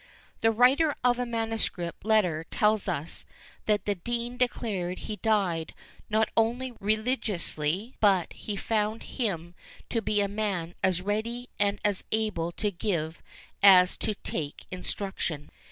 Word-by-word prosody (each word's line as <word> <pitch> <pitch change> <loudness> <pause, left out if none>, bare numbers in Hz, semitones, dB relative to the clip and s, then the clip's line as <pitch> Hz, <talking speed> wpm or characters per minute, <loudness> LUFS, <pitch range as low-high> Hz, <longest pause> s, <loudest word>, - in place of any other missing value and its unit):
The 225 - +5
writer 260 +7 +4
of 245 0 +3
a 250 - -1
manuscript 225 -7 -2
letter 190 -7 +3
tells 210 +2 +2
us, 165 -3 -3 0.4
that 210 -2 +2
the 205 - +2
dean 240 +5 -3
declared 205 -7 -1
he 215 - -5
died 195 -8 0 0.3
not 220 0 +3
only 240 +3 +1
religiously, 210 - -1
but 195 -5 +3
he 210 - -5
found 215 +1 -1
him 175 -9 -3 0.4
to 230 - +1
be 210 -1 +1
a 200 - +2
man 200 -5 -2
as 185 -1 +2
ready 230 +5 -2
and 205 0 +2
as 205 -2 +1
able 210 -6 0
to 210 +3 -1
give 170 -4 -2 0.4
as 185 -2 +8
to 215 - -1
take 150 -6 -4
instruction. 180 -5 -3
210 Hz, 135 wpm, -28 LUFS, 180-225 Hz, 0.4 s, as